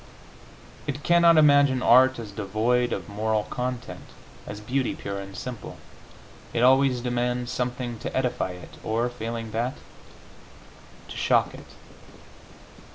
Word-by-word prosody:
It 145 +1 -4
cannot 170 -1 +5
imagine 145 -4 +5
art 130 +2 +6
as 110 -3 -7
devoid 110 +5 0
of - - -4
moral 105 +1 -1
content, 125 -1 -4 0.4
as 105 - -6
beauty 125 +5 -1
pure 100 0 -5
and 100 -1 -9
simple. 125 +2 -7 0.8
It 120 - +2
always 130 -1 +4
demands 125 0 -1
something 125 -2 -3
to - - -4
edify 125 -8 -1
it, 90 -1 -12
or, 115 +3 0
failing 115 -1 -5
that, 120 +4 -2 1.3
to - - -9
shock - - +2
it. - - -12
120 Hz, 125 wpm, -25 LUFS, 110-130 Hz, 1.3 s, art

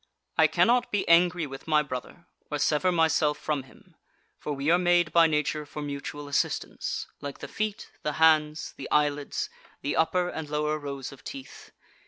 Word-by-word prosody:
I - - +6
cannot 245 +1 +3
be 205 - 0
angry 175 0 +4
with 135 +1 -9
my 155 -1 +4
brother, 140 +5 -7 0.2
or 150 - -1
sever 150 +5 +2
myself 160 -3 +2
from 150 -3 -2
him, 130 - -20 0.4
for 150 - -4
we 140 +3 0
are 175 - +5
made 175 -2 +3
by 170 -1 +6
nature 150 0 0
for 150 0 -7
mutual 145 0 -5
assistance, 145 - -1 0.2
like 140 -1 -6
the - - -7
feet, 215 0 -4
the 150 - -2
hands, 155 -1 +3
the - - -7
eyelids, 145 -1 0 0.3
the 145 - -1
upper 175 +2 +2
and 160 -3 -5
lower 150 +1 0
rows 140 -2 -6
of 140 - -14
teeth. 275 -1 -9
150 Hz, 175 wpm, -27 LUFS, 145-170 Hz, 0.4 s, I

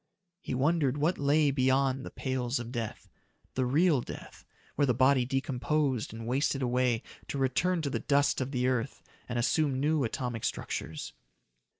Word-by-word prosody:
He 130 - -4
wondered 145 0 +2
what 155 +5 +1
lay 145 +1 +3
beyond 135 0 +2
the - - -6
pales 130 -1 -2
of 120 0 -5
death 115 -4 -5 0.5
the 130 -1 0
real 150 +1 +3
death, - - -10 0.3
where 145 - +2
the 125 - +2
body 130 0 +4
decomposed 135 -1 0
and 115 +1 -7
wasted 135 +2 0
away 125 -1 +1 0.2
to - - -4
return 160 +6 +1
to 140 - 0
the - - -1
dust 140 -1 +2
of 130 - -2
the 125 -3 -1
earth 130 +1 -1 0.3
and 120 - -2
assume 135 +2 +1
new 150 +1 +2
atomic 120 -1 -3
structures. 80 -5 -4
130 Hz, 165 wpm, -30 LUFS, 125-145 Hz, 0.5 s, body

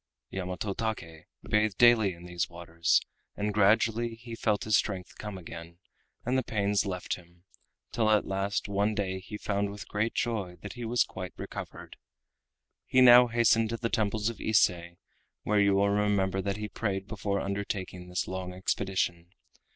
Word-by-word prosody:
Yamato 95 +2 -3
Take 95 -8 -4 0.2
bathed 105 -2 +1
daily 115 -6 +5
in 85 +1 -13
these 90 -1 -2
waters, 85 -1 +1 0.4
and 105 0 -1
gradually 115 +3 +3
he 115 +1 -10
felt 110 -2 0
his 110 -1 +2
strength 95 -4 -1
come 105 -2 -6
again, 85 -1 -10 0.5
and 125 +2 +1
the 130 - +3
pains 100 -2 0
left 90 -2 -3
him, 85 -1 -19 0.5
till 110 -2 +1
at 105 -1 +3
last 100 +2 -1
one 100 +1 0
day 95 -2 -2
he 100 +3 -8
found 100 -1 -1
with 100 0 -8
great 105 +2 -1
joy 105 -7 -1
that 105 - -6
he 120 -1 -6
was 120 +2 +3
quite 90 -1 -8
recovered. - - -8 0.9
He 130 - +3
now 125 -1 +9
hastened 115 -1 +3
to 115 - -2
the 115 0 -2
temples 110 -1 0
of 115 - -4
Ise, 110 -5 +4 0.7
where 105 0 +2
you 100 -1 +4
will 100 +1 +3
remember 100 -2 +1
that 100 +1 -2
he 105 0 -4
prayed 100 -3 -3
before 100 -2 -2
undertaking 95 -2 -4
this 90 0 -2
long 90 -1 -5
expedition. 90 -2 -1
100 Hz, 165 wpm, -29 LUFS, 95-110 Hz, 0.9 s, now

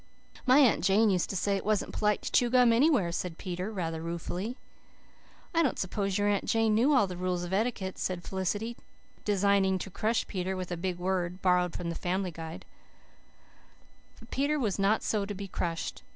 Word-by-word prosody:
"My 255 +2 +7
Aunt 265 -7 +5
Jane 205 +2 +4
used 180 -2 0
to - - -3
say 200 +2 +1
it - - -5
wasn't 215 -1 0
polite 210 -1 +1
to - - -4
chew 245 - +3
gum 245 -1 +5
anywhere," 245 - +3
said 170 -1 -4
Peter 180 +2 -4
rather 165 -5 -3
ruefully. 175 - -4 1.0
"I 335 - +3
don't 280 -7 +1
suppose 195 +1 -1
your 205 0 +1
Aunt 205 -1 +1
Jane 225 -1 +2
knew 240 +7 +4
all 260 -8 +5
the 185 -2 -6
rules 180 0 -2
of 175 +1 -5
etiquette," 200 -3 -1
said 180 -2 -2
Felicity, 205 +5 -2 0.5
designing 200 -1 +2
to 190 +1 -6
crush 220 +5 0
Peter 190 -1 -3
with 185 -1 -5
a - - -1
big 180 +1 -3
word, 180 0 -1
borrowed 180 -1 +2
from 175 -1 -3
the - - -2
Family 185 +1 -2
Guide. 165 0 -8 1.5
But 230 - -16
Peter 285 +3 +1
was 210 -6 -1
not 200 +3 +3
to 205 -1 -1
be 200 +1 -6
so - - -12
crushed. 165 -1 -3
195 Hz, 195 wpm, -29 LUFS, 180-220 Hz, 1.5 s, My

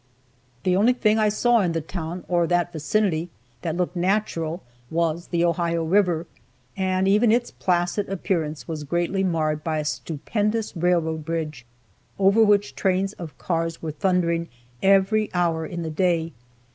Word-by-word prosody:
The 180 -1 +2
only 220 +6 +4
thing 220 -3 +2
I 215 -1 +3
saw 235 +3 +3
in 180 -5 +1
the 165 - 0
town, 170 +2 -5
or 175 -1 +2
that 175 0 +1
vicinity, 170 +1 0 0.3
that 165 0 -3
looked 180 0 -1
natural, 175 -3 -1 0.3
was 170 0 -1
the 170 -1 +1
Ohio 170 -1 0
river, 175 -1 +2 0.5
and 190 0 0
even 210 +3 +4
its 240 +1 +1
placid 175 +2 0
appearance 165 -5 -2
was 155 -3 -4
greatly 175 +5 0
marred 155 -4 0
by 160 -1 -1
a 150 - -2
stupendous 200 - -2
railroad 165 -2 +1
bridge, 150 -6 -4 0.5
over 200 +3 +5
which 205 -1 +3
trains 195 +1 0
of 170 -6 -9
cars 165 -1 -2
were 160 - -2
thundering 170 -1 0 0.3
every 195 +2 +3
hour 165 -2 +1
in 170 -1 -5
the 160 - -4
day. 165 0 0
175 Hz, 155 wpm, -24 LUFS, 165-195 Hz, 0.5 s, over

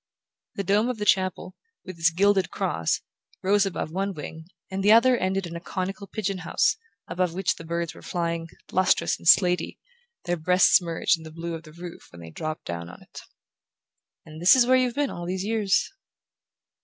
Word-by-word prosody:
The 200 - -2
dome 205 +5 +2
of 250 - -3
the 210 - -3
chapel, 185 -1 +1 0.3
with 185 -2 -9
its 165 +1 +4
gilded 190 +2 +2
cross, 80 0 -1 0.4
rose 200 +1 +3
above 175 -4 -4
one 195 +2 -2
wing, 160 +2 -8 0.3
and 190 0 -3
the 205 - +5
other 240 +3 +6
ended 190 -3 -1
in 170 0 -7
a - - -4
conical 190 +3 -5
pigeon 195 -2 -3
house, 170 - +1 0.3
above 180 -2 -1
which 190 -1 +1
the - - -9
birds 170 0 -3
were - - -14
flying, 170 -1 -3 0.2
lustrous 185 0 +2
and - - -8
slatey, 180 +1 +4 0.5
their 175 0 -1
breasts 180 +4 +4
merged 170 0 0
in - - -12
the 160 - -9
blue 165 +2 -6
of 165 - -6
the 155 -2 -15
roof 170 +1 -10
when 85 - -13
they 80 -1 -10
dropped 155 - -5
down 85 0 -5
on - - -13
it. - - -12 1.0
"And 155 0 -11
this 175 - +7
is 255 -2 +5
where 255 +1 +4
you've 255 -2 +1
been 290 -1 0
all 175 0 -6
these 185 +1 -2
years." 210 -2 +1
180 Hz, 195 wpm, -25 LUFS, 165-195 Hz, 1.0 s, this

